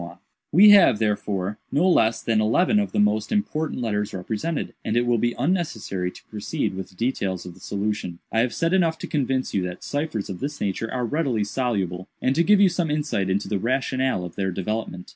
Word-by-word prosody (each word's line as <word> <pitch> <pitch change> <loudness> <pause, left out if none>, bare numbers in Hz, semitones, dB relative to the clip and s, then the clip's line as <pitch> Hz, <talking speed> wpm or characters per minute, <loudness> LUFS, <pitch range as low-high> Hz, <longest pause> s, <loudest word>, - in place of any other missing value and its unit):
u 85 - -9 0.3
"We 205 +6 +8
have, 195 - +7
therefore, 105 -2 -1
no 165 +6 +3
less 115 -10 +3
than 110 -2 +2
eleven 175 - +3
of 205 - -1
the - - -3
most 105 +1 +2
important 160 - -1
letters 105 -3 -2
represented, 110 - -3
and 110 - -1
it 120 - +2
will 120 -1 +2
be 120 +2 0
unnecessary 120 - -1
to - - -14
proceed 105 -3 -3
with 95 0 -6
the - - -21
details 100 -5 -2
of 90 - -8
the 90 - -18
solution. 100 -3 -3
I 115 - +1
have 120 +1 +2
said 165 +2 0
enough 170 -4 +2
to - - -6
convince 135 -3 -1
you 95 - +1
that 90 - -8
ciphers 145 -8 -3
of 95 -2 -6
this 145 +1 -4
nature 100 +3 -2
are 125 -1 -1
readily 130 -5 0
soluble, 100 -6 -2
and 130 - +1
to 170 - +3
give 205 +2 +5
you 200 - +7
some 175 -2 -1
insight 145 -11 -1
into 100 +2 0
the 100 - -1
rationale 130 -3 0
of 85 - -9
their 95 -1 -1
development. 95 0 -4
115 Hz, 215 wpm, -24 LUFS, 100-150 Hz, 0.3 s, We